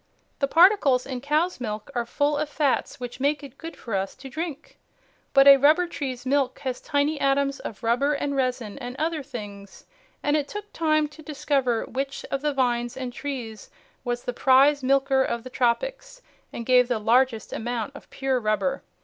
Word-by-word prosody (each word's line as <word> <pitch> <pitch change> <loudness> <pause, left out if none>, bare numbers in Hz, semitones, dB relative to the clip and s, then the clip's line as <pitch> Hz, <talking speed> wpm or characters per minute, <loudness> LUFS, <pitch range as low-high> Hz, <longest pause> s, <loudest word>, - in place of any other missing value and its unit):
The 275 - +1
particles 325 -6 +5
in 255 -2 -5
cow's 305 +5 0
milk 215 +1 -5
are 240 -2 -2
full 290 +3 +1
of 295 +1 -2
fats 285 -1 0
which 245 0 -7
make 290 +2 0
it 275 -1 -12
good 330 0 -8
for 230 - -7
us 195 0 -2
to 270 - -10
drink. 315 0 -6 0.5
But 275 -1 +6
a 275 0 +10
rubber 305 +6 +4
tree's 265 -7 -5
milk 265 -1 +1
has 260 -3 -4
tiny 290 +1 0
atoms 275 0 +1
of 225 - -8
rubber 250 +6 +2
and 280 0 -2
resin 255 -3 -2
and 245 -1 -6
other 320 0 -1
things, 205 -7 -9 0.4
and 290 +1 +2
it 295 -2 0
took 415 0 -8
time 310 -2 +2
to 300 +1 -14
discover 275 -6 -1
which 275 +1 -4
of 275 - -1
the 300 0 0
vines 240 -3 0
and 255 -2 -5
trees 240 -8 -6 0.3
was 245 -1 -3
the 245 - -3
prize 275 +3 +4
milker 270 0 +3
of 235 -2 -3
the 255 - -9
tropics - - -1 0.3
and 235 - -6
gave 250 0 +5
the 245 -2 0
largest 230 +2 +2
amount 240 +3 -3
of - - -13
pure 270 -1 -1
rubber. 215 +5 0
270 Hz, 185 wpm, -25 LUFS, 245-290 Hz, 0.5 s, a